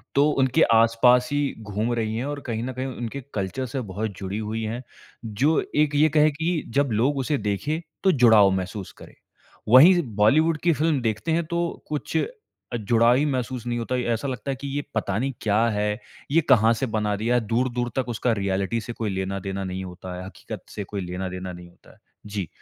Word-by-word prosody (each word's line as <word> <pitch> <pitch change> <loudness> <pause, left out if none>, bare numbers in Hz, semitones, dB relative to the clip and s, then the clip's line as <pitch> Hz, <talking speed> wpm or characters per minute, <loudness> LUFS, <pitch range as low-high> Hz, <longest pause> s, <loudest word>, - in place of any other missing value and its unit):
तो 145 +2 +5
उनके 130 -1 +2
आस-पास 115 +2 +4
ही 145 - +1 0.3
घूम 105 +4 -1
रही 110 -1 -1
हैं 125 - -2
और 145 0 -4
कहीं 115 -1 -2
न 130 +1 -4
कहीं 130 +1 -4
उनके 125 +1 -5
कल्चर 105 +6 -2
से 130 +2 -3
बहुत 105 +3 -3
जुड़ी 95 +1 -4
हुई 110 +1 -3
हैं। 115 +4 -4 0.4
जो 130 +9 +2 0.2
एक 145 -1 -2
ये 155 +2 +5
कहे 155 0 +4
कि 160 +2 -1
जब 140 -3 +2
लोग 125 +7 +1
उसे 140 +2 0
देखे, 110 - -2 0.2
तो 190 - +5
जुड़ाव 110 - +6
महसूस 95 +1 -5
करे, - - -13 0.5
वहीं 170 +9 +8
बॉलीवुड 155 +10 +4
की 170 -2 +4
फ़िल्म 150 -3 +1
देखते 110 +8 -1
हैं 165 0 +1
तो 170 +1 -1 0.3
कुछ 150 +2 -3 0.6
अ, - - 0
जुड़ाव 115 +3 +3
ही 145 - +2
महसूस 130 -3 -2
नहीं 120 0 -1
होता 125 +2 -2
है। 125 - -1
ऐसा 115 +5 -3
लगता 130 +2 -3
है - - -2
कि 140 - -4
ये 145 - -2
पता - - -1
नहीं 135 +3 -1
क्या 105 0 +2
है, 105 0 -1 0.3
ये 165 - +4
कहाँ 115 -2 +6
से 125 +4 -2
बना 105 -1 0
दिया 115 +4 0
है, 120 - +3
दूर-दूर 120 +1 0
तक 130 -1 0
उसका 120 +1 0
रियलिटी 100 +4 -1
से 120 +2 -6
कोई 110 -3 -3
लेना 95 0 -3
देना 95 0 -4
नहीं 95 0 -4
होता 90 0 -8
है, 90 - -7
हकीकत 95 - -9
से 105 - -5
कोई 100 0 -5
लेना 90 +1 -4
देना 90 0 -6
नहीं 90 0 -11
होता 85 - -21
है। - - -24 0.3
जी। 100 -4 -4
115 Hz, 215 wpm, -24 LUFS, 105-135 Hz, 0.6 s, वहीं